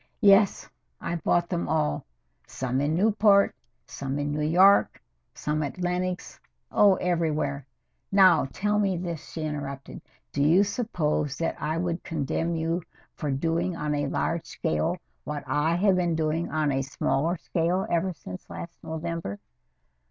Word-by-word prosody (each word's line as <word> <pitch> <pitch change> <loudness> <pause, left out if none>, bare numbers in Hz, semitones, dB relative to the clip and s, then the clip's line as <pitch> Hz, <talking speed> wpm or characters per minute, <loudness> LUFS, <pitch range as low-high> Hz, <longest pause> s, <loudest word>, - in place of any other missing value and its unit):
"Yes, 200 -1 +5 0.3
I 170 - -3
bought 170 +1 +1
them 175 -2 -2
all. 115 - 0 0.4
Some 130 +1 -2
in 150 +2 +1
Newport, 205 +1 +4 0.3
some 135 0 -4
in 145 0 -1
New 150 - -1
York, 180 +6 +5 0.4
some 150 +1 -1
at 145 +3 -4
Lenox 180 0 -2 0.3
oh, 200 -2 +5
everywhere! 155 -6 -1 0.4
Now, 185 -6 +6
tell 210 +1 0
me 195 -3 +1
this," 170 -3 -4
she 160 - -5
interrupted. 140 -3 -5 0.3
"Do 140 - -1
you 165 +7 +5
suppose 160 - -1
that 165 - -1
I 155 +2 -1
would 170 0 -2
condemn 165 +2 -2
you 165 +2 -1 0.3
for 150 - -4
doing 165 +6 0
on 150 -1 -1
a 145 -1 0
large 165 +4 -1
scale 165 +2 -1 0.3
what 150 -1 -4
I 150 +5 +1
have 190 +1 +3
been 175 -2 +1
doing 160 +1 -1
on 155 -2 +1
a 135 0 0
smaller 140 +5 0
scale 170 +4 0
ever 175 +2 0
since 90 - -10
last 170 0 -8
November?" 160 - -4
165 Hz, 150 wpm, -26 LUFS, 150-180 Hz, 0.4 s, Now